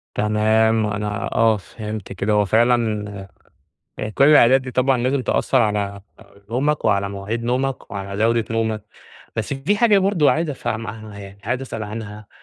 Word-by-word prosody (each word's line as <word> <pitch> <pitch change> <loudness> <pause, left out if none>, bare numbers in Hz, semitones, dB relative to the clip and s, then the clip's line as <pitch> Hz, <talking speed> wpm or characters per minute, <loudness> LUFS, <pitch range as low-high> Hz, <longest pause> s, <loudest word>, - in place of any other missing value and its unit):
تمام، 110 +1 +2
أنا 105 -1 -3
آه، 110 -1 +4
فهمت 105 0 -7
كده. 100 +3 -1
هو 105 0 +3
فعلًا 105 -3 +1 0.7
يعني 105 - -3
كل 135 - +3
العادات 135 -3 +6
دي 130 - -7
طبعًا 130 0 +2
لازم 130 +1 0
تأثِّر 130 0 +1
على 100 -1 -1 0.5
نومك 145 +5 0
وعلى 100 0 +2
مواعيد 100 +4 -4
نومك 130 +2 -2
وعلى 100 +1 -3
جودة 115 0 +2
نومك. 110 -2 -1 0.5
بس - - -2
في 145 +10 0
حاجة 210 -3 +5
برضه 190 -6 +3
عايِز 160 0 0
أفهمها، 110 -5 -5
يعني 100 0 -11
عايِز 120 +4 -2
أسأَل 115 -4 -5
عنها، 105 -1 -7
110 Hz, 155 wpm, -21 LUFS, 105-130 Hz, 0.7 s, العادات